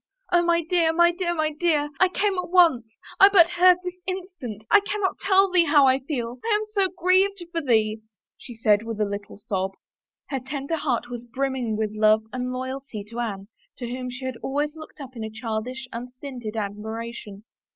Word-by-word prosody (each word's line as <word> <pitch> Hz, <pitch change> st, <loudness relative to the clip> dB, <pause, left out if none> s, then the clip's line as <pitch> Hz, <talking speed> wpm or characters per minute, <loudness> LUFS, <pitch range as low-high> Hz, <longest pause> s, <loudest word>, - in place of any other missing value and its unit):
" -, -, -34 dB
Oh, 350 Hz, 0 st, +5 dB
my 340 Hz, 0 st, +2 dB
dear, 330 Hz, 0 st, +2 dB
my 345 Hz, +1 st, +4 dB
dear, 345 Hz, 0 st, -2 dB
my 310 Hz, -1 st, 0 dB
dear! 300 Hz, -2 st, 0 dB
I 370 Hz, -, +6 dB
came 400 Hz, +2 st, 0 dB
at 360 Hz, -, -4 dB
once... 290 Hz, -12 st, +3 dB, 0.2 s
I 390 Hz, -, +9 dB
but 345 Hz, -4 st, +6 dB
heard 360 Hz, 0 st, +6 dB
this 360 Hz, 0 st, -6 dB
instant... 355 Hz, -, -6 dB
I 415 Hz, -, +8 dB
cannot 405 Hz, -1 st, -2 dB
tell 390 Hz, -1 st, +3 dB
thee 355 Hz, -2 st, +5 dB
how 290 Hz, -2 st, +5 dB
I 260 Hz, 0 st, +4 dB
feel. 255 Hz, -3 st, -4 dB
I 450 Hz, -, +2 dB
am 425 Hz, +1 st, -1 dB
so 395 Hz, -2 st, +3 dB
grieved 370 Hz, +1 st, +2 dB
for 335 Hz, -1 st, -1 dB
thee," 220 Hz, -5 st, +1 dB, 0.3 s
she 240 Hz, -, -11 dB
said 210 Hz, -2 st, +3 dB
with 225 Hz, -1 st, -6 dB
a 210 Hz, -, +2 dB
little 200 Hz, 0 st, -6 dB
sob. 195 Hz, -2 st, -3 dB, 0.6 s
Her 270 Hz, -, -2 dB
tender 275 Hz, +4 st, -4 dB
heart 245 Hz, -5 st, -2 dB
was 240 Hz, -1 st, -6 dB
brimming 250 Hz, -2 st, -2 dB
with 215 Hz, -1 st, -1 dB
love 215 Hz, 0 st, +4 dB
and 250 Hz, 0 st, -3 dB
loyalty 260 Hz, -3 st, -5 dB
to 235 Hz, -, -5 dB
Anne, 200 Hz, -4 st, -4 dB, 0.3 s
to 240 Hz, -2 st, -5 dB
whom 250 Hz, 0 st, -4 dB
she 250 Hz, +1 st, -7 dB
had 260 Hz, -2 st, -4 dB
always 290 Hz, +5 st, -2 dB
looked 315 Hz, 0 st, -12 dB
up 265 Hz, -2 st, -9 dB
in 220 Hz, -1 st, -5 dB
childish, 230 Hz, +3 st, -4 dB
unstinted 245 Hz, -2 st, -7 dB
admiration. 215 Hz, 0 st, -6 dB
265 Hz, 195 wpm, -24 LUFS, 230-345 Hz, 0.6 s, I